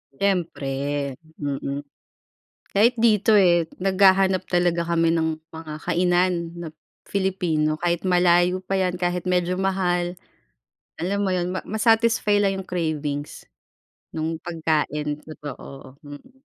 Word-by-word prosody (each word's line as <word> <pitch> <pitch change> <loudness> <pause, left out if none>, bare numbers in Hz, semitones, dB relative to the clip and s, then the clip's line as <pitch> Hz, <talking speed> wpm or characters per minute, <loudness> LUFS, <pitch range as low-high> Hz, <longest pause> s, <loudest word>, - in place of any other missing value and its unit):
Siyempre, 175 -7 -1 0.7
mm. 140 0 -3 0.9
Kahit 225 +5 +4
dito 220 -1 +4
eh, 175 -5 +5 0.2
naghahanap 190 -1 +4
talaga 175 -1 +1
kami 165 -1 +2
ng 160 -1 0
mga 160 -1 -8
kainan 180 +1 +2 0.2
na 170 -1 -7 0.4
Filipino 180 -6 0
kahit 175 +1 0
malayo 180 0 +3
pa 195 +1 -2
yan 185 -1 +1
kahit 175 0 -1
medyo 180 0 0
mahal. 180 -2 0 0.8
Alam 195 +4 -2
mo 200 - 0
yun 180 0 -1
ma 185 - -2
ma-satisfy 220 -1 +3
lang 195 -1 +1
yung - - -22
cravings, 150 -4 -3 0.7
nung 160 +1 -3
pagkain 150 -3 -1
totoo 140 -3 -10
mm. 245 - -13
175 Hz, 115 wpm, -23 LUFS, 160-190 Hz, 0.9 s, eh